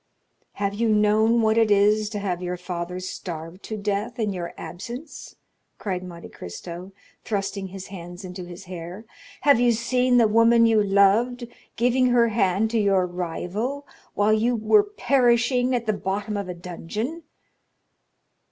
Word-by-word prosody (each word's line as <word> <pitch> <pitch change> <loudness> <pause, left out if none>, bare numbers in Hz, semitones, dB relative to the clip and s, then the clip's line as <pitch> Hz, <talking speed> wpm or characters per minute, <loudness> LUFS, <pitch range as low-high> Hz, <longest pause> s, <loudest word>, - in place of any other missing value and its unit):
"Have 200 0 -2
you 225 +2 0
known 215 +2 +3
what 220 +1 +3
it 225 -1 +3
is 210 +1 +3
to 210 - -5
have 185 -3 -2
your 180 0 -3
father 180 0 -5
starve 175 -1 -7
to 220 - -6
death 205 +4 -2
in 215 -4 -1
your 175 -2 -5
absence?" 240 - -8 0.4
cried 185 -3 -3
Monte 170 -2 -9
Cristo, 170 - -8 0.3
thrusting 195 -2 -3
his 190 0 -8
hands 175 -1 -9
into 180 0 -7
his 175 +2 -10
hair; 180 +3 -8 0.4
"have 280 -3 +5
you 245 0 +4
seen 250 +2 +2
the 230 -2 +5
woman 230 +2 +5
you 225 -2 +4
loved 210 +5 +3 0.3
giving 250 +2 +2
her 240 -1 +4
hand 205 0 +1
to 230 - +1
your 195 -3 +3
rival, 180 - -4 0.3
while 205 +1 +3
you 230 +3 +2
were 220 - +4
perishing 250 - +2
at 235 -1 -2
the 215 - +1
bottom 200 +2 -3
of 200 -2 -4
a 180 - -4
dungeon?" 180 - -5
210 Hz, 155 wpm, -24 LUFS, 185-235 Hz, 0.4 s, have